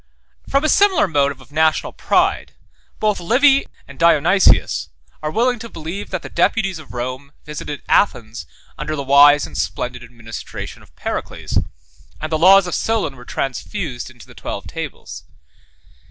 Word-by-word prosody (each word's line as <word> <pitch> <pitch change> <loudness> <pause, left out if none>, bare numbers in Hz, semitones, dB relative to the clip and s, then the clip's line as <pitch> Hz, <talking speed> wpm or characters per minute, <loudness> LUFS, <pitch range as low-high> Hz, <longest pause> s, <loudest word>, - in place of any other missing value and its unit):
17 - - -12
From 275 +1 +3
a - - +3
similar 400 - +4
motive 140 -4 0
of 130 +1 -18
national 155 +1 +1
pride, - - +1 0.5
both 215 -1 +1
Livy 270 +9 +4 0.2
and - - -13
Dionysius 170 +3 +4 0.3
are 155 - -2
willing 240 +7 +1
to 230 - -8
believe, 165 +3 -6
that 185 -3 -4
the - - -6
deputies 190 0 +1
of 155 - -12
Rome 130 +3 -5
visited 150 -1 -6
Athens 115 - +1 0.3
under 155 +1 -3
the 140 - -3
wise 140 +1 +6
and 75 - -11
splendid 105 +9 -3
administration 115 -2 -8
of - - -21
Pericles; - - -3 0.6
and 155 +1 -5
the 155 - +1
laws 190 +3 +7
of 175 - -4
Solon 220 -11 -1
were 125 -1 -13
transfused 135 - -4
into 120 -3 -15
the - - -16
twelve - - -6
tables. - - -7
155 Hz, 155 wpm, -19 LUFS, 130-195 Hz, 0.6 s, laws